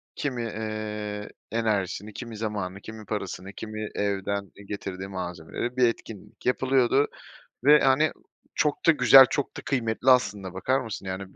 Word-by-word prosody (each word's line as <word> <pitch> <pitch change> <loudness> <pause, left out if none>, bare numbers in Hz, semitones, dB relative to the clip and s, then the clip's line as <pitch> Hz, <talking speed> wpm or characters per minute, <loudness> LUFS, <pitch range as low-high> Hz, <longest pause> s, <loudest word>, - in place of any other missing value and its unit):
kimi, 130 -4 -2
ııı, 105 -1 -4 0.2
enerjisini, 105 -2 -1
kimi 115 -1 -7
zamanı, 100 -3 -4
kimi 110 0 -9
parasını, 95 -2 -5
kimi 110 0 -6
evden 100 -1 -2 0.2
getirdiği 95 -2 -5
malzemeleri... 90 +6 -5
Bir 125 -1 +5
etkinlik 115 -3 -7
yapılıyordu 130 +2 +3 0.6
ve, 150 +2 +7
hani, 135 +4 +3 0.4
çok 150 -1 0
da - - +10
güzel, 135 -2 +9
çok 145 -2 -2
da - - -5
kıymetli 120 -1 0
aslında. 100 -7 +2
Bakar 130 +8 +1
mısın? 110 -5 -6
Yani, 95 0 -6
110 Hz, 135 wpm, -26 LUFS, 100-125 Hz, 0.6 s, da